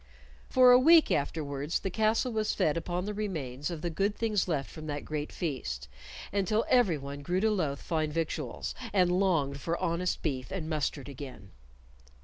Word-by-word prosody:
For 255 -1 +7
a 250 - +8
week 320 +4 +6
afterwards 145 0 -1
the 195 - -3
castle 220 +4 +1
was 215 -1 0
fed 150 - +2
upon 175 +2 -2
the 210 - -3
remains 155 -11 -3
of 165 -2 -6
the 175 - -1
good 200 +5 0
things 215 -4 0
left 145 -6 -2
from 155 -1 -8
that 145 -1 -4
great 150 -1 -4
feast, 65 - -4 0.5
until 205 +3 +1
everyone 150 - +2
grew 175 +6 0
to 220 +2 +2
loathe 155 -9 0
fine 155 -1 -1
victuals, 155 -4 -3 0.2
and 180 -3 +4
longed 165 -7 +1
for 170 +1 -1
honest 180 0 -1
beef 130 -5 -2
and 180 -5 -4
mustard 150 -3 -2
again. 130 -8 -9
165 Hz, 170 wpm, -30 LUFS, 145-200 Hz, 0.5 s, a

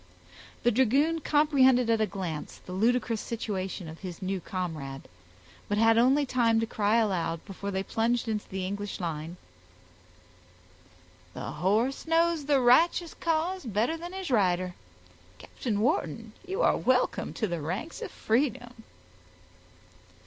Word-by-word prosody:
The 240 - +4
dragoon 275 +8 +2
comprehended 275 -5 +4
at 225 -1 +2
a 215 - +2
glance 180 -5 -5
the - - -9
ludicrous 230 +3 +1
situation 195 -5 -4
of 160 +1 -9
his 180 -4 -7
new 190 0 -2
comrade, 155 -8 -5 0.6
but 205 - 0
had 225 +1 +5
only 265 +5 +4
time 235 -3 +2
to 225 - +1
cry 215 -1 +1
aloud, 185 -7 0
before 200 0 -6
they 190 -1 -2
plunged 230 +3 0
into 215 -2 -3
the 190 -1 -3
English 200 +2 -4
line,— 165 0 -4 2.0
"The - - -5
horse 215 - 0
knows 330 -2 +2
the 285 -1 +3
righteous 320 +7 +4
cause 335 +3 -1
better 230 +7 0
than 345 +2 -8
his 380 -6 -5
rider. 185 -5 +2 0.6
Captain 215 - -4
Wharton, 230 - -1
you 385 +6 -1
are - - +4
welcome 255 0 +1
to 220 - -1
the 170 -5 -3
ranks 185 - -4
of - - -4
freedom." 240 -1 -1
225 Hz, 140 wpm, -28 LUFS, 190-265 Hz, 2.0 s, had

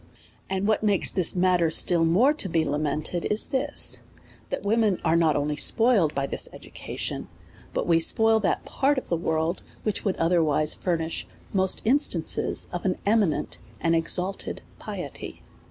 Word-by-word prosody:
And 190 +1 -1
what 215 - +2
makes 205 -3 +2
this 185 -2 +2
matter 180 -2 +3
still 170 +1 +3
more 220 - +4
to 255 -11 -2
be 165 -1 +1
lament 150 +2 -2
ed, 175 - -2
is 210 - 0
this, 285 +1 0 0.5
that - - -4
women 210 -2 +2
are 160 - +3
not 165 -2 +3
only 145 +1 -1
spoiled 210 - +3
by 140 0 0
this - - -1
education, - - -6 0.4
but - - -2
we 165 -1 +3
spoil 220 +6 +3
that 205 - -1
part 280 +1 +1
of 260 - -4
the 170 - +1
world 160 +1 -1 0.2
which 215 - -2
would 195 -3 0
otherwise 160 -3 +2
furnish 165 -2 -2 0.3
most 190 -1 +1
instances 225 - 0
of 175 - -4
an 185 -2 0
eminent 205 -6 +1 0.2
and 165 0 +1
exalted 180 +4 -1 0.2
piety. - - -7
180 Hz, 160 wpm, -25 LUFS, 165-210 Hz, 0.5 s, more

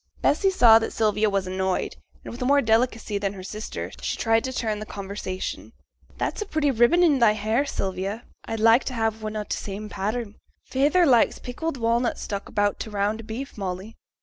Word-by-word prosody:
Bessy 385 +7 +3
saw 235 -12 +7
that 225 - -3
Sylvia 215 -1 +2
was 195 -1 0
annoyed, 185 0 -1 0.3
and, - - -8
with 240 - -9
more 280 +3 +4
delicacy 225 -3 +1
than 200 0 -2
her 190 -2 -9
sister, 215 +3 -6
she - - -2
tried 225 0 +2
to 260 - -3
turn 220 -4 -2
the 215 - -6
conversation. 195 -1 -5 0.4
'That's - - -2
a 420 - -3
pretty 305 -5 +1
ribbon 240 +9 +4
in 295 -6 +4
thy 225 -3 +5
hair, 220 +6 0
Sylvia; 195 +1 -3 0.2
I'd 225 - -4
like 225 +3 +5
to 255 - -4
have 225 -1 -1
one 215 0 -4
o' 210 - -2
t' - - -3
same 210 +1 -6
pattern. 215 +2 -3 0.3
Feyther 295 +7 +3
likes 245 -6 +4
pickled 275 +4 -4
walnuts 235 +1 0
stuck 200 -1 -5
about 205 0 0
t' - - -5
round 210 +2 -1
o' - - -14
beef, 250 +6 -6
Molly.' 190 +3 -5
220 Hz, 200 wpm, -25 LUFS, 205-245 Hz, 0.4 s, saw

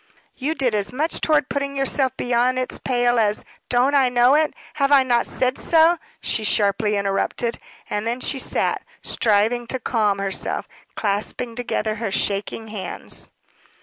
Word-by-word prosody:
"You 295 +5 -2
did 255 -6 0
as 205 -1 +1
much 300 +6 -1
toward 305 -4 +2
putting 280 0 -2
yourself 270 -1 0
beyond 245 +1 +1
its 255 0 -2
pale 245 -2 +1
as 210 -1 +1
" - - -35
"Don't 250 +3 +3
I 270 -3 +4
know 245 +1 +4
it? 305 0 +3 0.2
Have 280 -1 +1
I 275 -2 +7
not 240 -2 +1
said 255 0 -1
so?" 330 +1 +4 0.2
she 220 - -1
sharply 210 0 +2
interrupted. 200 +4 -1 0.3
And 210 +2 -2
then 240 +2 -1
she 270 +1 -1
sat, - - 0 0.2
striving 225 +3 +1
to 260 - -2
calm 215 -4 +1
herself, 195 -1 -2 0.3
clasping 215 +3 -2
together 225 -2 -2
her 220 -4 -2
shaking 205 +3 -2
hands. 210 -3 -4
245 Hz, 160 wpm, -22 LUFS, 215-265 Hz, 0.3 s, I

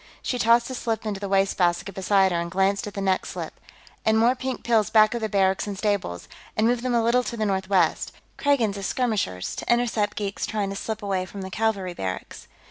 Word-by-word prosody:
She 250 - -2
tossed 235 +1 +4
a - - -3
slip 225 -3 -2
into 205 -2 -3
the 200 -1 -4
wastebasket 195 -1 +1
beside 190 0 +3
her 170 - 0
and 170 - -4
glanced 195 +4 +1
at 205 - -8
the 200 - -3
next 190 -1 0
slip. - - -6 0.4
"And 220 0 +3
more 235 +3 +4
pink 260 0 -4
pills 225 -3 +2
back 215 0 +5
of 235 - -3
the 220 - -1
barracks 195 0 +1
and 200 -1 -4
stables, 200 - -2 0.3
and 215 - +3
move 240 +1 +2
them 250 -1 0
a 230 - +3
little 235 +2 +3
to 240 -1 -5
the 215 - 0
northwest; 190 -3 +1 0.2
Kragans 235 -8 +1
as 195 - -3
skirmishers, 210 - -1
to - - -2
intercept 230 -4 +1
geeks 200 -1 -3
trying 205 -2 -2
to - - -5
slip 220 +2 -4
away 190 -2 -1
from 200 +2 -8
the 190 - -7
cavalry 205 -5 -1
barracks." 95 - -6
205 Hz, 220 wpm, -25 LUFS, 190-230 Hz, 0.4 s, back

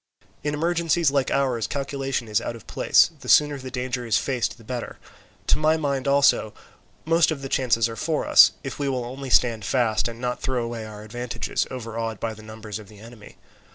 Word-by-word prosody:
In 150 0 -1
emergencies 170 -1 +1
like 140 -2 +1
ours 130 -5 0
calculation 135 -3 -3
is 105 -1 +1
out 120 - -4
of 115 - -13
place; - - +3
the - - -9
sooner 145 -1 +5
the 130 0 -7
danger 125 -1 -3
is 115 -2 +2
faced 125 -3 -1
the 115 - -16
better. 120 +1 -5 0.5
To - - +2
my 155 +1 +3
mind 140 -3 -2
also 140 -6 +3 0.5
most 165 +1 +4
of 145 -4 -3
the - - -3
chances 120 -4 +2
are 115 - -7
for 155 +7 -1
us, - - +8
if 135 0 -6
we 140 -1 0
will 125 -2 -2
only 135 +2 -7
stand 115 -3 +3
fast 115 +1 +1
and 115 0 -8
not 125 0 -3
throw 130 -2 -1
away 115 -2 -5
our 105 -1 -10
advantages, 120 +3 -3
overawed 115 -3 -5
by 115 -1 -3
the 110 - -13
numbers 110 -1 -8
of 105 - -12
the 105 - -15
enemy. 110 0 -14
125 Hz, 205 wpm, -24 LUFS, 115-140 Hz, 0.5 s, us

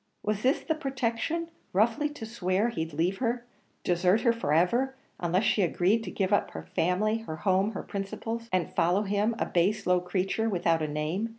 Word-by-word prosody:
Was 210 0 -1
this 260 +4 +2
the 320 - 0
protection 275 +3 -2 0.2
roughly 230 +9 +2
to 295 -6 -8
swear 205 0 0
he'd 160 -8 -3
leave 170 +6 0
her, 240 -1 -1 0.4
desert 180 +4 +3
her 235 -3 +4
for 230 -10 -2
ever, 235 - +2 0.2
unless 180 +3 +1
she 210 - +2
agreed 190 +5 +2
to - - -4
give 195 0 0
up 205 - +2
her 80 - -7
family, 180 - 0
her 225 -8 -6
home, 190 +5 +1
her - - -5
principles, 225 +3 -5
and 185 -2 0
follow 180 +5 +3
him, 205 +3 +1
a - - 0
base 185 +5 +1
low 180 0 +3
creature, 190 +5 -1
without 170 -4 +1
a 155 - 0
name? 155 +9 -2
200 Hz, 190 wpm, -28 LUFS, 180-230 Hz, 0.4 s, her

